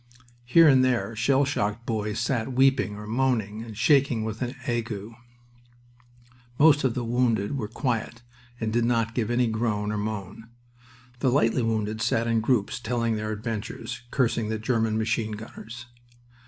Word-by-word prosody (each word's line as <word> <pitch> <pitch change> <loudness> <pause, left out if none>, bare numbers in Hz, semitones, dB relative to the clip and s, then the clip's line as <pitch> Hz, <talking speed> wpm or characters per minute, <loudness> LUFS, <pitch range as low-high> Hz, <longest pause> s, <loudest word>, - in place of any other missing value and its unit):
Here 165 +7 +6
and 130 -3 +6
there 125 -3 0
shell 135 +5 +2
shocked 115 -4 -2
boys 105 -1 -2
sat 120 +1 -1
weeping 130 -4 +3
or 105 0 -8
moaning, 110 -3 0
and 110 -2 -9
shaking 125 -2 +3
with 110 +1 -5
an 125 0 -3
ague. 115 -4 -3 1.5
Most 145 -1 +5
of 130 -3 +1
the 125 - -2
wounded 115 -1 0
were 115 -6 -3
quiet 120 0 -3 0.4
and 110 -1 -2
did 120 0 +2
not 115 -1 +1
give 115 -3 -1
any 120 +1 +2
groan 110 -2 -1
or 105 - -2
moan. 105 +1 -5 0.7
The 130 - +2
lightly 125 -1 +2
wounded 110 -1 -1
sat 115 0 +1
in 115 -1 +1
groups, 110 -3 0
telling 115 -1 -1
their 110 0 -3
adventures, 110 +2 -5
cursing 115 -4 0
the 110 - -1
German 110 -1 0
machine 110 0 -1
gunners. 115 +2 -9
115 Hz, 155 wpm, -26 LUFS, 110-125 Hz, 1.5 s, Here